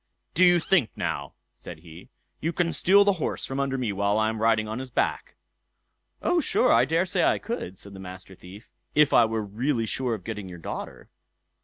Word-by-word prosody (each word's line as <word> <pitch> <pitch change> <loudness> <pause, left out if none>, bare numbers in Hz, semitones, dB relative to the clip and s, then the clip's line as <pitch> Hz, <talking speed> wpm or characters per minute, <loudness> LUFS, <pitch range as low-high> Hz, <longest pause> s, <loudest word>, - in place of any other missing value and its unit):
"Do 185 - +3
you 175 -1 +6
think 160 - +2
now", 70 0 -4 0.2
said 80 -3 -11
he, 85 0 -13 0.3
"you 165 - -1
can 170 -1 0
steal 200 +3 +5
the 200 - +4
horse - - -2
from 135 +1 -4
under 135 -1 -1
me 125 -5 -1
while 100 +1 +1
I 110 0 +2
am 110 - -4
out - - -6
riding 110 -1 +2
on 110 +3 -4
his 130 0 -7
back?" 125 - -2 0.9
"O, 355 - +2
yes! 310 - -3
I 120 +2 +5
daresay 165 +6 +1
I - - +3
could", 95 - -5
said 100 +1 -10
the 95 - -10
Master 95 0 -10
Thief, 95 +5 -13 0.3
"if 150 -1 +4
I 120 - +6
were 110 -1 -2
really 115 +4 -1
sure 120 +2 -1
of 100 - -11
getting 105 -2 -6
your 90 - -9
daughter." 85 - -7
115 Hz, 210 wpm, -26 LUFS, 100-150 Hz, 0.9 s, you